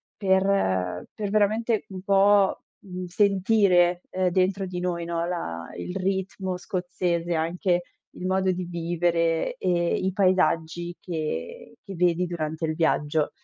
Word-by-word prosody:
per 190 - +1
per 205 -2 -4
veramente 215 +1 +1
un 185 -1 -7
po', 200 0 +4
mhmm, 185 -1 -7
sentire, 185 -2 +3
ehm, 185 -1 +1
dentro 190 +2 +1
di 180 -1 -4
noi, 175 -1 -2
no, 170 0 -2
la 85 - -4
il 180 - -5
ritmo 190 -1 -2
scozzese, 175 -2 -2
anche 175 +2 0 0.3
il 180 - -6
modo 190 0 +2
di 180 0 -3
vivere 170 -1 0
e 175 -2 +1
i 190 - -1
paesaggi 175 -3 +1
che 155 - -5
che 195 - -9
vedi 175 0 +2
durante 160 -1 -3
il 155 - -2
viaggio. 155 -2 +1
180 Hz, 135 wpm, -25 LUFS, 170-190 Hz, 0.3 s, po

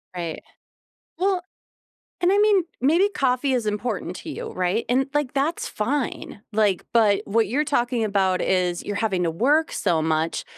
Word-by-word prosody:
Right. 170 -2 -5 0.8
Well 375 -1 +1 0.8
and 360 +2 +3
I 405 - +3
mean, 415 -4 +4 0.2
maybe 330 +9 +4
coffee 260 +1 +1
is 245 -3 0
important 210 -3 -3
to - - -10
you, - - -5
right, 185 +5 -1
and, 260 +2 +2
like, 290 -2 -1
that's 290 +5 -1
fine, 240 -3 -3
like, 205 -4 +1
but 215 -4 +4
what 220 +1 +2
you're 275 +9 0
talking 245 -5 0
about 195 -3 +1
is 180 -2 0
you're 205 -1 -4
having 200 -5 0
to 170 - +1
work 290 - +2
so 170 -5 0
much, 160 +1 -1
225 Hz, 165 wpm, -23 LUFS, 190-285 Hz, 0.8 s, mean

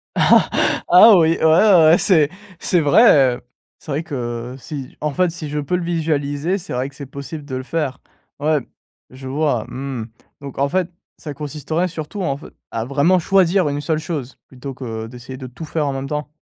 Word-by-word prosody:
Ah 215 +6 +5
oui, 165 -1 +3
ouais, - - -3
ouais. 165 0 +6
C'est 170 -6 +4 0.3
c'est 180 - +1
vrai, 145 - +5
heu, - - -17 0.4
c'est 155 - -9
vrai 145 +4 -1
que, 120 -4 -5
si 135 -1 -8
en 150 -1 -2
fait, 180 +3 +2
si 155 -2 -7
je 150 +1 -2
peux 145 +5 -1
le 180 - -2
visualiser, 160 0 -1
c'est 195 0 -7
vrai 125 +2 -2
que 140 - -18
c'est 140 - -8
possible 140 +3 -8
de 135 -3 -5
le 130 - -4
faire. 140 -2 -3 0.4
Ouais, 155 +1 +2 0.5
je 130 +1 -10
vois, 140 -4 0
mmh, 130 -4 -5 0.3
donc 140 -2 -9
en 140 - +2
fait, 185 +2 0 0.3
ça 150 - -7
consisterait 150 +4 -3
surtout 165 +4 -6
en 140 -5 -1
fe 145 - -13 0.3
à 115 0 -3
vraiment 145 +8 +2
choisir 185 -1 +3
une 145 0 -3
seule 155 0 -1
chose 150 -6 -5
plutôt 135 +1 -8
que 115 -4 -6
d'essayer 125 +2 -10
de 130 -1 -8
tout 125 +6 -9
faire 155 0 -2
en 140 - -1
même 135 0 -4
temps. 150 +1 -4
150 Hz, 195 wpm, -20 LUFS, 135-165 Hz, 0.5 s, ouais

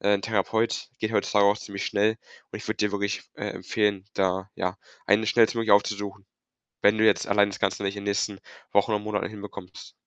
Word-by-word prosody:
äh, 100 - +3
‘n 100 - -1
Therapeut. 110 +2 0
Geht 110 +1 -2
heutzutage 105 -2 +3
auch 100 +1 +4
ziemlich 100 -1 -5
schnell 105 +2 +2 0.3
und - - -6
ich - - -9
würde - - -1
dir 105 - +1
wirklich, 100 0 -2
äh, - - -4
empfehlen, 105 -3 -1
da, 95 +1 0
ja, 90 +1 -2 0.3
eine 105 +2 +3
schnellstmöglich 115 -1 +3
aufzusuchen. 100 -1 +1 0.6
Wenn 105 +2 +5
du 110 - +4
jetzt - - +4
allein 100 0 +4
das 100 - -7
Ganze 95 0 0
nicht 100 +1 -1
in 100 - -6
nächsten 100 0 -1 0.3
Wochen 100 +2 +3
oder 105 - +2
Monaten 105 0 -2
hinbekommst. 100 -3 -10
100 Hz, 195 wpm, -26 LUFS, 100-110 Hz, 0.6 s, Wenn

